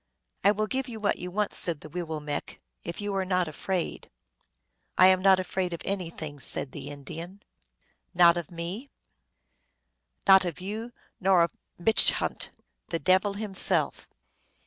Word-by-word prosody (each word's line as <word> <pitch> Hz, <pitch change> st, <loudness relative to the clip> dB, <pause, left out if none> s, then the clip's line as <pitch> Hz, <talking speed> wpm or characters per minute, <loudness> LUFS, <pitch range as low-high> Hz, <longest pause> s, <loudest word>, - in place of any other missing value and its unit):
" -, -, -36 dB
I 200 Hz, -, +6 dB
will 215 Hz, +1 st, +1 dB
give 265 Hz, +4 st, -2 dB
you 225 Hz, -2 st, -7 dB
what 205 Hz, -1 st, 0 dB
you 180 Hz, -, -5 dB
want," 205 Hz, +3 st, -1 dB
said 165 Hz, -4 st, +1 dB
the 155 Hz, -, -10 dB
Wee 175 Hz, +4 st, -3 dB
willmekq, 155 Hz, -3 st, -4 dB
" -, -, -53 dB
if 170 Hz, 0 st, -5 dB
you 205 Hz, -1 st, -2 dB
are 195 Hz, -1 st, 0 dB
not 185 Hz, -2 st, +1 dB
afraid." 175 Hz, +3 st, -3 dB, 0.4 s
" -, -, -46 dB
I 185 Hz, -, +8 dB
am 185 Hz, 0 st, +6 dB
not 190 Hz, -1 st, +6 dB
afraid 185 Hz, -1 st, -2 dB
of 170 Hz, -, -5 dB
anything," 165 Hz, -6 st, -4 dB
said 130 Hz, 0 st, -1 dB
the -, -, -7 dB
Indian. 165 Hz, +7 st, -8 dB, 0.3 s
" -, -, -43 dB, 0.3 s
Not 170 Hz, -1 st, +7 dB
of 175 Hz, -3 st, -4 dB
me? 180 Hz, +10 st, -6 dB, 0.4 s
" -, -, -48 dB
" -, -, -29 dB
Not 190 Hz, -1 st, +8 dB
of 175 Hz, -4 st, -4 dB
you 215 Hz, +6 st, -5 dB, 0.3 s
nor 185 Hz, -2 st, +5 dB
of 170 Hz, -, 0 dB, 0.3 s
Mitche 220 Hz, +5 st, +5 dB
hant, -, -, -2 dB, 0.4 s
the 165 Hz, -, 0 dB
devil 185 Hz, +3 st, +3 dB
himself." 205 Hz, -2 st, 0 dB
185 Hz, 180 wpm, -28 LUFS, 170-200 Hz, 0.4 s, I